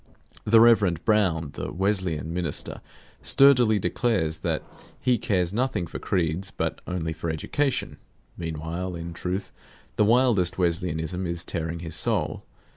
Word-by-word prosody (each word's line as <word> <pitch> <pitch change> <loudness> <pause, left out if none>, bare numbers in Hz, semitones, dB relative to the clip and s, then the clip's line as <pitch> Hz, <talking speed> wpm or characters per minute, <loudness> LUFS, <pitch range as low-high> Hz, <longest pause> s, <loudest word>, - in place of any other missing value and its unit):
The 115 +1 +6
Rev. 105 -8 +4
Brown, 90 -9 +2
the - - -5
Wesleyan 90 -4 -1
minister, 85 -4 -2 0.4
sturdily 125 -6 +5
declares 90 -4 0
that - - -2 0.4
he 125 -3 +2
cares 90 -5 0
nothing 120 -6 0
for - - -7
creeds, 90 +1 -1
but - - -3
only 80 -3 -2
for 80 +1 -4
education; 130 - -1 0.4
meanwhile, 85 +2 -4
in 85 0 -6
truth, 90 +4 -4 0.5
the - - +5
wildest 110 -6 +3
Wesleyanism 85 0 -1
is 85 0 -3
tearing 80 0 -3
his 80 -2 -4
soul. - - 0
90 Hz, 130 wpm, -25 LUFS, 80-105 Hz, 0.5 s, The